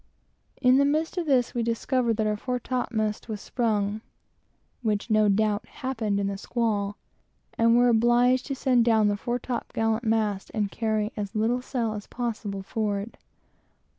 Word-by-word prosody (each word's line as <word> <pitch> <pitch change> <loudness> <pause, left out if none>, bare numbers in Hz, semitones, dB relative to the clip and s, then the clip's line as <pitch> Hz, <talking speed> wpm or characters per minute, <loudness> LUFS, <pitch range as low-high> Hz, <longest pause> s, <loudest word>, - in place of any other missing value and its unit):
In 255 -1 +5
the 280 - +5
midst 310 +4 0
of 335 - -3
this, 255 -4 +2
we 240 - -1
discovered 230 0 0
that 220 - +1
our 210 0 +1
fore 250 +4 -3
topmast 225 -4 -2
was 215 -2 -4
sprung, 215 -2 -1 0.8
(which 215 -1 -1
no 215 -1 +4
doubt 210 +1 +1
happened 225 -7 -2
in 200 - 0
the 195 0 -3
squall,) 210 -3 -1 0.6
and 230 0 +4
were 245 0 +5
obliged 240 +2 +3
to 275 - -2
send 255 -3 +3
down 220 -3 +4
the 205 - +1
fore 240 +4 -2
top 245 -1 -4
gallant 225 +1 0
mast 215 -3 0
and 205 -2 0
carry 215 -1 -1
as 205 0 -5
little 230 +4 +1
sail 240 -4 -2
as 210 -1 -7
possible 215 -5 -4
forward. 205 +1 -2
225 Hz, 165 wpm, -26 LUFS, 210-245 Hz, 0.8 s, In